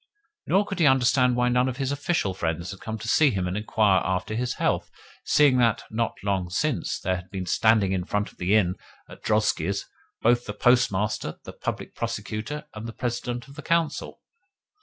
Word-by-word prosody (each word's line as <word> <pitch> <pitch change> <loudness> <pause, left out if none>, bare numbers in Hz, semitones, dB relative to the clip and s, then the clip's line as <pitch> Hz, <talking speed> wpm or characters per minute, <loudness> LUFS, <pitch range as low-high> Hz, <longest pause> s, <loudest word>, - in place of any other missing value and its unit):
Nor 195 +3 +3
could 195 -2 -5
he 160 - +5
understand 125 -1 +4
why 125 0 +2
none 125 +1 +2
of 130 - -5
his 135 -1 -1
official 140 - 0
friends 85 0 -3
had 95 - -9
come 110 0 -5
to 110 - -8
see 150 +5 +5
him 95 -6 -1
and 90 - -3
inquire 105 -2 +2
after 95 +3 -2
his 125 +3 -1
health, - - 0 0.3
seeing 140 -4 +4
that, 115 -3 +2
not 115 +1 -1
long 95 -3 -1
since, 85 - -1
there 95 0 -1
had 90 +1 -10
been 95 -1 -4
standing 110 +1 +3
in 90 -2 -1
front 105 +1 -1
of - - -27
the 90 +4 +2
inn 90 -4 +2 0.3
the - - -12
drozhkis 100 -3 0 0.4
both 120 +1 +5
of 120 - -21
the 105 - -5
Postmaster, 105 -7 +1
the - - -9
Public - - -5
Prosecutor, 145 +9 -4
and 110 +2 -7
the 115 - -7
President 120 0 -3
of 140 - -13
the 150 - -8
Council. 165 0 -1
110 Hz, 200 wpm, -25 LUFS, 95-125 Hz, 0.4 s, he